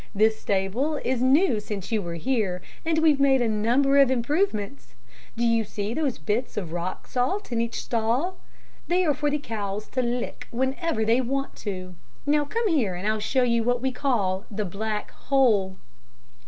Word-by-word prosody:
This 220 +2 +3
stable 205 +10 0
is 250 -1 0
new 265 - +4
since 205 -1 -6
you 220 -2 +1
were 170 -2 -5
here, 205 -2 0 0.2
and 325 -1 +1
we've 315 -3 +4
made 275 -1 +5
a 240 - +2
number 245 +6 +3
of 275 -2 +6
improvements. 230 - -1 0.4
Do 235 - +1
you 230 -1 +3
see 205 +1 -4
those 285 -3 -1
bits 210 +11 -2
of 180 -6 -3
rock 175 +1 -4
salt 260 +9 -1
in 230 -1 +1
each 235 0 -3
stall? 240 +11 0 0.5
They 360 +1 +2
are 300 - +3
for 295 +1 0
the 295 - 0
cows 210 -6 -4
to 255 - 0
lick 245 0 -3
whenever 265 0 -1
they 230 +3 +3
want 275 +2 -2
to. 185 -3 -5 0.3
Now, 295 0 +2
come 455 +9 -1
here, 250 - +1
and 185 +4 -4
I'll 215 0 +1
show 255 +5 +1
you 235 -2 +2
what 245 +1 +1
we 260 +1 0
call 205 -9 0
'The 210 0 -3
Black 210 +3 -3
Hole.'" 215 -9 +2
235 Hz, 180 wpm, -25 LUFS, 210-275 Hz, 0.5 s, of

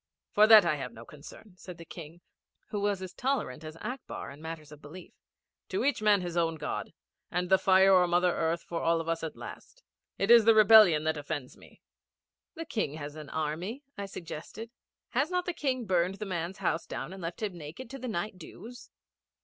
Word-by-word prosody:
'For 210 +1 +5
that 215 -4 +9
I 155 -3 +1
have 125 -4 -6
no 115 +1 -11
concern,' 150 - -13
said 180 -2 -10
the 170 - -11
King, 165 +1 -11 0.5
who 210 - -3
was 200 -2 0
as 185 -1 -7
tolerant 250 - -2
as 155 +1 -9
Akbar 250 - -6
in 140 +2 -13
matters 160 -2 -8
of 150 0 -13
belief. 165 +5 -12 0.6
'To 380 - -1
each 285 -5 +1
man 210 -2 +4
his 175 -1 -5
own 165 -1 +1
God 155 - -4 0.4
and 180 +1 -2
the 190 - +6
fire 190 0 +5
or 180 -1 +5
Mother 175 +1 +3
Earth 165 +1 -1
for 170 -1 -4
us 165 0 0
all - - 0
at - - -25
last. - - -11 0.3
It 195 +4 +2
is 235 -2 +8
the 225 -1 +6
rebellion 215 -7 +7
that 155 0 0
offends 145 -3 -5
me.' - - -19 0.7
'The 330 0 -6
King 215 - -2
has 150 -1 -7
an 155 -2 -9
army,' 170 - -3
I 200 -1 -5
suggested. 195 +5 -8 0.4
'Has 270 +6 0
not 360 0 -1
the 355 - -2
King 260 -6 -2
burned 185 -1 +1
the 210 - -6
man's 180 0 -4
house 170 -3 -1
and 190 +2 -6
left 170 +5 -5
him 200 -4 -3
naked 165 - -9
to 270 - -7
the 255 - -5
night 205 -2 -3
dews?' 235 +8 -11
180 Hz, 205 wpm, -29 LUFS, 160-215 Hz, 0.7 s, that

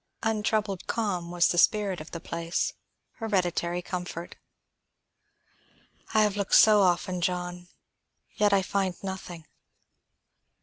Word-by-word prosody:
Untroubled 215 -3 -1
calm 190 -7 -2
was 175 -1 +3
the 175 - +1
spirit 200 -4 +2
of 155 - -10
the 170 - -6
place, 170 0 -2 0.4
hereditary 180 -5 -1
comfort. 175 -1 -6 1.8
"I 215 - +6
have 210 -2 +1
looked 200 -1 +1
so 210 -1 +7
often, 180 0 +1
John. 180 0 -2 0.7
Yet, 210 -1 +2
I 195 -1 +3
find 190 -1 -1
nothing." 185 -4 -6
185 Hz, 115 wpm, -27 LUFS, 175-205 Hz, 1.8 s, so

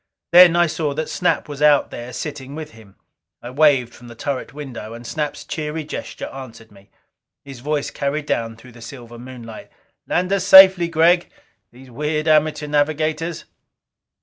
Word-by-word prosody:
Then 175 -1 +8
I 175 0 +4
saw 150 -3 -3
that 155 +1 -3
Snap 180 - -1
was 145 -1 -8
out 150 -1 +4
there 120 +1 -8
sitting 140 -2 -7
with 155 -1 -8
him. 110 -4 -18 0.4
I 120 - -9
waved 135 -4 +2
from 120 - -15
the 120 - -12
turret 140 +2 -4
window, 125 -6 -8
and 120 +1 -11
Snap's 150 +3 -4
cheery 155 0 -4
gesture 150 - -7
answered 115 -4 -11
me. 100 -1 -20 0.6
His 135 -3 -10
voice 145 +2 -3
carried 145 +2 -3
down 115 -5 -2
through 125 +3 -16
the 120 0 -16
silver 120 -1 -11
moonlight: 120 -3 -11 0.4
"Land 180 +2 0
us 195 -2 0
safely, 190 -3 +8
Gregg. 170 +2 +2 0.4
These 130 +1 -16
weird 150 +4 -3
amateur 155 -1 +2
navigators!" 155 +2 -1
145 Hz, 165 wpm, -20 LUFS, 120-155 Hz, 0.6 s, Then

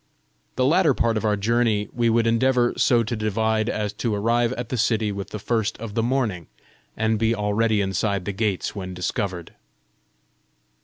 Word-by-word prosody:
The 130 - +1
latter 155 -1 +4
part 115 -1 +1
of 110 - -1
our 105 -1 +2
journey 110 0 +1
we 120 -1 +1
would 115 0 +2
endeavour 120 +1 +2
so 120 -2 +3
to 115 +2 -3
divide 110 +1 0
as 105 -1 -2
to 115 -4 -2
arrive 115 +3 +1
at 120 -3 -5
the - - -2
city 110 -2 +1
with 100 -1 -6
the - - -5
first 110 +1 -1
of 110 -2 -7
the 115 - 0
morning, 115 - -1 0.5
and 110 0 +1
be 115 +1 +2
already 105 +1 +1
inside 95 0 -1
the 100 - -2
gates 100 -1 -2
when 95 -2 -6
discovered. 90 -1 -3
110 Hz, 175 wpm, -23 LUFS, 105-115 Hz, 0.5 s, latter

